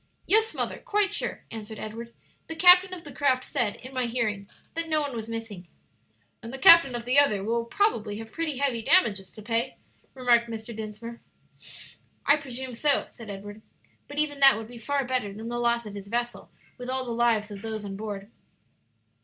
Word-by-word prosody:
"Yes, 440 +3 +3
mother, - - -3
quite 410 -1 0
sure," - - -2
answered 220 -1 -8
Edward; 230 +3 -7 0.4
"the 325 - -5
captain 360 +2 +7
of 360 -2 -8
the 290 - -8
craft 260 -3 +1
said, 240 -7 -1
in 255 +2 -12
my 255 -2 0
hearing, 215 -4 -2 0.2
that 330 0 -2
no 310 -1 +2
one 285 -4 -2
was 225 0 -6
missing." 225 -6 -7 0.7
"And 230 0 -8
the 265 - -6
captain 275 -1 +8
of 235 -1 -5
the 255 +3 +5
other 210 -9 +3
will 230 +2 -1
probably 230 - 0
have 225 0 -9
pretty 320 -2 -3
heavy 265 -4 0
damages 200 - +2
to 215 - -11
pay," 230 +3 -1 0.4
remarked 240 -2 +3
Mr. 225 0 -7
Dinsmore. 220 +2 -8 1.0
"I 290 - +5
presume 260 -3 -6
so," 285 +4 +2
said 230 -3 -12
Edward; 205 +2 -8 0.5
"but 290 - -10
even 295 -2 -1
that 270 -5 +7
would 220 0 -7
be 240 -1 -10
far 275 +4 -1
better 245 -5 -1
than 220 +3 -7
the 240 0 -3
loss 235 -1 +1
of 210 - -8
his 200 -1 -8
vessel, 240 +2 -3 0.3
with 250 0 -7
all 260 0 -2
the 240 - -5
lives 230 -2 +1
of 200 -1 -8
those 220 -1 -5
on 195 -1 -6
board." 205 0 -7
235 Hz, 195 wpm, -26 LUFS, 220-275 Hz, 1.0 s, captain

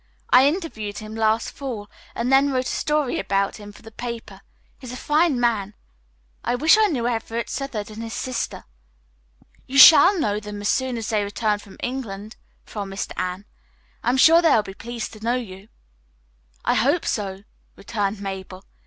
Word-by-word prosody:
I 260 +2 +7
interviewed 285 - -3
him 215 +1 -8
last 220 0 +1
fall 240 -7 -6 0.3
and 245 +3 0
then 275 +1 +5
wrote 255 -1 0
a - - -3
story 300 -3 0
about 195 +2 0
him 205 -1 -10
for 205 - -17
the 225 - -12
paper. 230 -4 -7 0.4
He 255 - -11
is - - -6
a 250 - -6
fine 300 -2 +2
man. 215 -4 0 0.7
I 240 - 0
wish 315 +8 +5
I 435 0 +4
knew 250 - -1
Everett 230 0 -3
Southard 250 -6 -4
and 215 +1 -8
his 225 -2 -6
sister." 255 -2 -4 1.0
"You 270 - -2
shall 345 +7 +9
know 210 -7 0
them 210 -1 -8
as 205 - -1
soon 260 -2 0
as 225 - -4
they 215 -2 +1
return 205 +1 -1
from 200 -1 -14
England," 220 -5 -5 0.3
promised 195 -2 -5
Anne. 185 +2 -4 0.6
"I - - +1
am 255 - +2
sure 330 +5 +7
they 330 - +4
will 215 - +3
be 195 - -9
pleased 235 +2 -6
to 215 - -12
know 235 +2 +1
you." 200 -5 -7 1.0
"I - - +3
hope 285 +8 +2
so," 195 -2 -3 0.3
returned 205 -1 -3
Mabel. 190 -1 -7
225 Hz, 180 wpm, -23 LUFS, 205-260 Hz, 1.0 s, shall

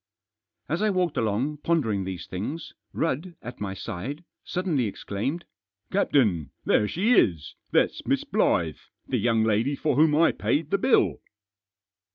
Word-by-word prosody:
As - - -1
I 215 - +3
walked 180 -5 0
along, 115 +7 0
pondering 120 - 0
these 95 -2 -5
things, 125 - -5 0.2
Rudd, 165 +3 -2
at 120 -1 -8
my 95 -2 -3
side, 115 - -5 0.2
suddenly 170 -9 -1
exclaimed: 110 - -3 0.2
" 100 +1 -48
Captain, 115 - +2 0.2
there 105 - +3
she 205 - +2
is! 85 - +2 0.2
that's - - +1
Miss - - +1
Blyth 80 -4 0 0.2
1 - - -28
the - - +1
young 115 -2 +2
lady 110 +6 +1
for 150 -1 0
whom 155 0 +5
I 165 +2 +5
paid 155 +1 -1
the 200 - +2
bill 255 - +3
130 Hz, 155 wpm, -26 LUFS, 100-165 Hz, 0.2 s, whom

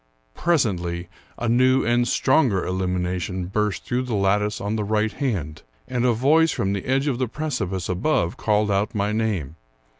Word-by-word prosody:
Presently 90 - 0 0.3
a 120 - -2
new 130 +3 +3
and 120 +1 +2
stronger 130 -6 +2
illumination 90 -1 -2
burst 105 +1 -2
through 125 +1 0
the 125 -3 -3
lattice 105 +1 +1
on 105 +2 -2
the 110 - -1
right 105 +1 0
hand, 90 - -3 0.3
and 125 -1 -1
a - - +4
voice 155 +8 +4
from 100 -8 -1
the 100 - -4
edge 135 +2 +1
of 135 -4 -1
the 130 - 0
precipice 110 - -3
above 90 - 0
called 105 -1 +1
out 105 +4 0
my 105 0 0
name. 100 -9 -2
105 Hz, 170 wpm, -23 LUFS, 95-125 Hz, 0.3 s, a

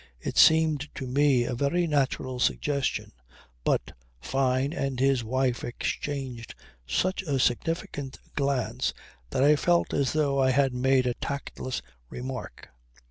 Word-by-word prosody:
It - - -5
seemed 160 -2 +5
to 135 - -5
me 135 -1 +3
a 125 - -2
very 140 +8 +1
natural 135 -4 0
suggestion; 140 +2 0 0.5
but - - 0 0.3
Fyne 130 - 0
and 135 -6 -2
his 135 -2 +3
wife 125 +1 0
exchanged 125 -1 -4 0.3
such 185 - 0
a 145 -7 -1
significant 135 +1 -1 0.2
glance 140 -4 0 0.3
that 130 - +1
I 150 +2 +6
felt 170 +3 +2
as 140 -2 +1
though 140 -3 +2
I 130 - +4
had 135 0 +3
made 130 +1 +2
a 125 - +1
tactless 135 -1 -5 0.3
remark. 130 - -7
135 Hz, 135 wpm, -27 LUFS, 130-145 Hz, 0.5 s, I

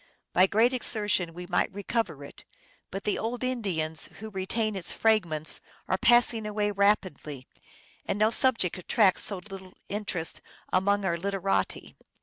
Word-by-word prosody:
By 185 +2 +6
great 230 +6 +3
exertion 210 -7 0
we 180 +2 -8
might 175 +4 +1
recover 200 -6 -2
it, 140 - -11 0.5
but 195 +1 -6
the 210 - 0
old 240 +3 -3
Indians 180 -11 -1
who 220 +1 -8
re 190 -1 -4
tain 215 -1 0
its 185 -4 -2
fragments 170 -9 +1 0.3
are 185 - 0
passing 240 -2 +4
away 210 0 0
rapidly, 185 -9 0 0.6
and - - -1
no 215 +1 +3
subject 230 - +2
at 180 - -14
tracts 200 -5 +4
so 200 - 0
little 190 0 -10
interest 200 -5 -3 0.3
among 200 +2 +2
our 170 -2 +1
literati. 195 +1 -2
200 Hz, 150 wpm, -28 LUFS, 180-215 Hz, 0.6 s, By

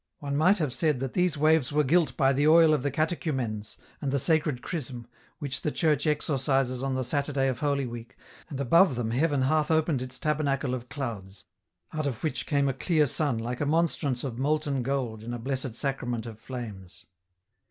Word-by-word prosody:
One 140 -2 -4
might 180 +8 +4
have 150 -8 -1
said 150 -4 +1
that 135 -1 -3
these 180 -4 +1
waves 155 -2 +3
were 150 +1 +3
gilt 165 +4 +2
by 135 0 +4
the 145 +3 +2
oil 160 0 +7
of 150 - +1
the 145 - 0
catechumens, 130 -9 -2 0.2
and 140 -3 -1
the 140 - +2
sacred 150 -3 +1
Chrism, 125 -8 -5 0.3
which 140 -2 -4
the 150 - -1
Church 155 -3 +1
exorcises 135 -4 0
on 135 -1 -1
the 130 - -1
Saturday 140 +1 0
of 125 -1 -3
Holy 140 -2 0
Week, 120 -1 -8 0.3
and 140 - -5
above 150 +3 +4
them 115 -2 -2
heaven 140 +2 +1
half 155 +3 +2
opened 160 -4 +2
its 130 0 -6
tabernacle 140 -3 0
of 125 -1 -5
clouds, 105 -9 -6 0.5
out 155 -2 -1
of 125 -5 -4
which 155 - -2
came 140 -2 +2
a 135 - +1
clear 155 +3 +2
sun 145 -2 0
like 120 +2 -4
a - - +1
monstrance 150 -5 0
of 125 -4 -4
molten 145 -1 0
gold 125 -4 -2
in 120 +2 -5
a - - -4
Blessed 130 0 -3
Sacrament 125 -4 -2
of 110 -2 -9
flames. 110 -8 -8
140 Hz, 195 wpm, -27 LUFS, 125-150 Hz, 0.5 s, oil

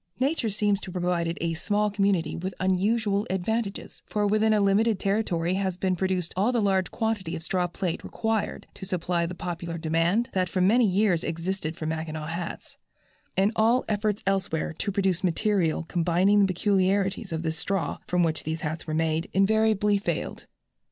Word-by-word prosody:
Nature 270 -3 +1
seems 205 -1 +1
to - - -8
have 180 0 -4
provided 170 -1 0
a 165 0 0
small 205 +5 0
community 195 -6 +1
with 185 +2 -4
unusual 200 +3 +1
advantages, 200 +3 -2
for 210 -1 0
within 215 +2 +3
a 215 - +4
limited 200 +1 +3
territory 185 -4 0
has 190 -2 -1
been 185 0 0
produced 185 -2 -1
all 205 +6 +2
the 240 - +1
large 190 -3 +1
quantity 215 -6 -2
of 165 - -6
straw 180 +1 0
plait 175 0 -3
required 225 -2 -2
to - - -11
supply 175 -2 -1
the 180 - -6
popular 170 -1 -5
demand 165 +8 +1
that 185 -2 +1
for 185 - -2
many 220 +6 +4
years 190 -3 +2
existed 165 -1 -3
for 155 - -5
Mackinaw 160 -1 -3
hats, 170 +1 -6 0.6
and 195 +2 +3
all 230 +3 +3
efforts 210 -1 -1
elsewhere 190 -5 0
to 200 +5 -3
produce 190 -2 0
material 180 -2 +1
combining 175 +4 +2
the 200 - +5
peculiarities 195 +1 +1
of 160 0 -3
this 160 -1 -1
straw, 195 -6 -1
from 180 0 +2
which 160 -1 0
these 160 +1 -3
hats 160 +1 -4
were 155 - -2
made, 160 +1 0
invariably 210 0 +3
failed. 200 - -3
190 Hz, 175 wpm, -26 LUFS, 170-205 Hz, 0.6 s, the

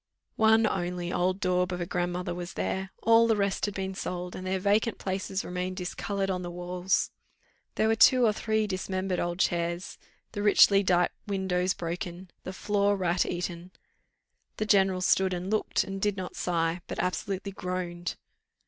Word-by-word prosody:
One 220 0 +5
only 175 -3 -2
old 185 +2 +1
daub 180 -1 +1
of 180 - -3
a 175 - -2
grandmother 175 +1 -2
was 175 0 -6
there; 190 0 -2
all 230 0 +6
the 225 - +3
rest 200 -1 0
had 205 - -5
been 190 0 -3
sold, 180 -1 -5
and 185 - -6
their 190 +1 0
vacant 205 +4 +1
places 190 0 -3
remained 180 +1 -3
discoloured 195 +1 -2
on 180 -1 -2
the 175 - -5
walls. 180 +1 -1 0.6
There 220 - +2
were 220 - +4
two 250 +2 +6
or 215 - +3
three 220 0 0
dismembered 185 -1 -2
old 175 0 -2
chairs, 170 -1 -1 0.3
the 205 - -4
richly 205 -1 +6
dight 180 -2 +2 0.2
windows 190 -2 0
broken, 175 +1 -5
the 185 - -5
floor 205 +1 +1
rat 180 -1 +1
eaten. 175 0 -4 0.9
The 215 - -1
general 190 -3 +3
stood 185 0 +2
and 180 +3 -4
looked, 215 - +1
and 195 0 -6
did 205 -1 +1
not 185 -1 -5
sigh, 170 0 0
but - - -5
absolutely 195 +2 -2
groaned. 180 -2 -4
185 Hz, 170 wpm, -28 LUFS, 180-200 Hz, 0.9 s, all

